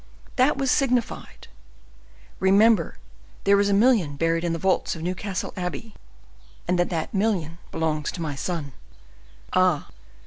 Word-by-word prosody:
That 265 +2 +3
was 270 -2 +1
signified. 250 -4 -1 0.9
'Remember 195 - +4 0.5
there 200 0 +4
is 200 0 +2
a - - +2
million 205 - +3
buried 165 +2 0
in 170 - 0
the 165 - -1
vaults 190 +1 0
of 160 - -7
Newcastle 185 +2 -3
Abbey, 185 +4 -5 0.7
and 180 0 +1
that 175 - +2
that 165 -3 -3
million 190 -6 -1
belongs 155 -2 -1
to 170 - -6
my 150 -2 -3
son.'" 145 -1 -4 0.8
"Ah! 185 -5 +2
185 Hz, 140 wpm, -24 LUFS, 165-210 Hz, 0.9 s, Remember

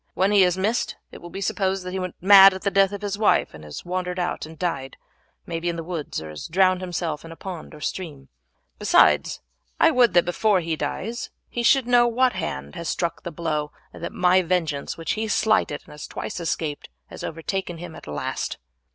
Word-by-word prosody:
When 190 +2 +2
he 200 -2 +6
is 180 0 +2
missed 215 +5 0 0.2
it - - -11
will 175 - -9
be 195 - -7
supposed 190 0 0
that 180 - -4
he 190 - -3
went 185 -1 -4
mad 195 0 +9
at 190 - -8
the 200 - +1
death 195 0 +4
of 205 0 -6
his 200 0 -3
wife, 220 - +3
and 80 0 -11
has 75 - -8
wandered 180 0 -3
out 175 -3 -2
and 160 0 -12
died, 140 -7 -3 0.5
may 165 -1 -3
be 175 +1 -1
in 170 - -2
the 165 - -5
woods, 165 -3 -4
or 80 - -8
has 75 - -7
drowned 185 +1 +3
himself 170 -4 -3
in 165 - -10
a - - -9
pond 175 -3 -8
or 150 - -13
stream. 145 -5 -5 0.5
Besides, - - +4 0.4
I - - +6
would 240 -7 +4
that 175 - +5
before 195 +3 +2
he 165 -2 -2
dies 210 - -4 0.2
he 240 - -2
should 260 +2 +4
know 245 0 +5
what 250 +2 +2
hand 70 +1 -4
has 170 - -5
struck 170 -1 -2
the - - -5
blow, 155 -2 -3 0.2
and - - -11
that - - -3
my 180 +1 +4
vengeance, 165 -5 -1
which 165 -2 -3
he 220 0 -1
slighted 215 -8 +1
and - - -15
has 150 0 -8
twice - - -5
escaped, 160 -3 -3 0.2
has - - -8
overtaken 175 +2 -3
him 175 0 -8
at - - -12
last." 75 -1 -3
180 Hz, 220 wpm, -24 LUFS, 160-195 Hz, 0.5 s, mad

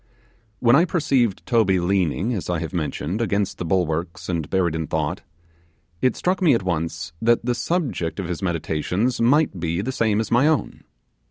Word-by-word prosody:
When 120 0 +5
I 160 - +6
perceived 135 - 0
Toby 110 -6 +3
leaning, 95 +4 0
as 95 -6 -4
I 90 - 0
have 80 +2 -5
mentioned, 85 +4 -2
against 100 -3 -1
the 90 - -3
bulwarks 85 -1 -1
and 85 -4 -2
buried 90 -4 +1
in 80 -1 -3
thought, 75 -2 -2 0.8
it 130 - +2
struck 185 +1 -1
me 160 -8 +5
at 115 - -1
once 80 -3 -3
that 115 +1 +2
the 125 - +1
subject 120 - -2
of 95 - -3
his 90 +1 -4
meditations 90 +6 -1
might 130 - +3
be 85 +1 -1
the 115 +7 -2
same 110 -4 +1
as 110 - -3
my 120 +5 +4
own. 155 -2 -1
95 Hz, 180 wpm, -22 LUFS, 85-120 Hz, 0.8 s, I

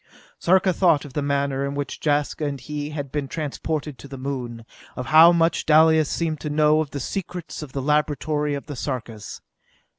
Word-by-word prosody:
Sarka 185 +1 +3
thought 170 -6 +3
of 140 - -11
the 145 - -1
manner 140 -1 0
in 140 0 -3
which 145 0 -4
Jaska 150 0 0
and 140 -1 -4
he 145 +3 -5
had 145 -3 -5
been 145 -2 -2
transported 150 -1 -4
to 140 - -10
the 135 0 -8
Moon; 125 -4 -5 0.3
of 125 - -5
how 165 +2 +9
much 170 -1 +2
Dalis 160 -1 +5
seemed 160 -3 -2
to 150 - -4
know 150 +1 +3
of 155 - -4
the 140 - -5
secrets 180 +3 -5
of 150 -4 -9
the 135 - -3
laboratory 150 0 0
of 140 - -6
the 145 - -7
Sarkas. 120 -5 -5
145 Hz, 190 wpm, -23 LUFS, 140-155 Hz, 0.3 s, how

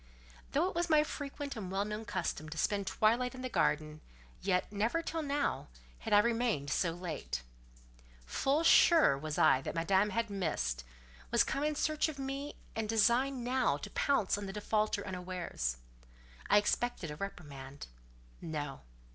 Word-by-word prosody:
Though 315 +6 +3
it - - -4
was 345 0 -1
my 305 -1 +5
frequent 285 -1 -5
and 195 -5 -5
well 195 +1 0
known 210 +1 -5
custom 155 -6 -3
to 165 - -7
spend 200 +4 0
twilight 245 +4 +2
in 255 - -8
the 255 - -2
garden, 155 -8 0 0.4
yet, 185 -1 0
never 225 +11 0
till 325 0 -2
now, 285 -1 -1 0.3
had - - -6
I 205 - +7
remained 225 - +1
so 175 - +2
late. 165 - -5 0.8
Full 275 - +1
sure 325 - +6
was 150 +2 -4
I 130 - +5
that - - -5
Madame 190 +5 +2
had 230 +1 -1
missed—was - - -2
come 280 - -2
in 305 0 0
search 310 +1 +1
of 300 - -7
me, 275 +2 -4 0.2
and 220 -1 -2
designed 240 +4 +3
now 255 +2 +1
to - - -8
pounce 220 -8 +1
on 200 - -5
the 195 - -6
defaulter 210 0 0
unawares. 180 - -3 0.7
I - - +6
expected 210 -4 0
a - - -6
reprimand. 145 -7 -7 0.6
No. 145 -4 -4
205 Hz, 160 wpm, -33 LUFS, 160-265 Hz, 0.8 s, I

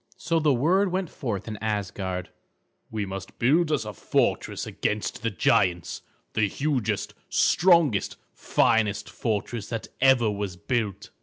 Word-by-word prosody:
So 165 +2 0
the 155 -2 +3
word 175 +10 +2
went 185 -2 -2
forth 115 -8 -4
in 110 -1 -5
Asgard: 95 -3 -3 0.6
"We 105 -2 -2
must 95 0 -7
build 155 +7 +3
us 135 -8 0
a 105 - -5
fortress - - 0
against 105 0 -2
the 115 - 0
giants; 90 -2 +1 0.3
the 110 -2 +2
hugest, 135 0 -1 0.2
strongest, 170 - +3 0.2
finest 105 -4 +1
fortress 105 +2 -3
that 115 -1 -4
ever 125 -4 +5
was 100 -3 -4
built." 105 -1 -2
110 Hz, 135 wpm, -26 LUFS, 100-140 Hz, 0.6 s, ever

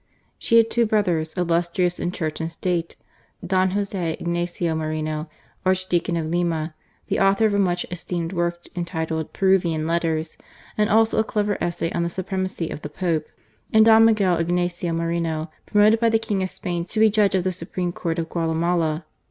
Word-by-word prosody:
She 230 - +3
had 225 0 +4
two 235 -1 +2
brothers, 175 -7 0
illustrious 175 +1 +1
in 175 - -1
Church 160 -3 -3
and 165 +1 -3
State: 170 -1 -2 0.5
Don 185 +1 +2
Joseph 195 -4 -2
Ignatius 175 -1 -1
Moreno, 155 0 -3 0.3
Archdeacon 185 -2 +1
of 165 - -2
Lima, 165 -1 -1 0.3
the - - -1
author 195 +3 +4
of 215 - +2
a 200 - +2
much 180 -2 +1
esteemed 175 0 -4
work 175 -1 -1
entitled 160 -2 -3
Peruvian 175 -5 +2
Letters, 165 -1 -1 0.4
and 210 -1 +1
also 220 +1 +3
a - - +4
clever 210 -2 -1
essay 170 -1 -2
on 170 - -1
the 170 - 0
Supremacy 185 -1 -3
of - - -6
the 150 - -6
Pope; 160 -1 -1 0.4
and 220 0 +6
Don 225 0 +7
Michael 200 -6 +3
Ignatius 175 +1 -1
Moreno, 165 -1 -2 0.2
promoted 210 +1 +4
by 230 0 +3
the 225 - +3
King 215 -3 -2
of 185 - -1
Spain 175 -2 -3
to 215 - -3
be 220 -1 +6
Judge 205 -2 +3
of 185 - +1
the 185 - 0
Supreme 180 0 -3
Court 170 -1 -3
of 165 -1 -2
Guatemala. 165 -1 0
175 Hz, 175 wpm, -23 LUFS, 165-195 Hz, 0.5 s, Don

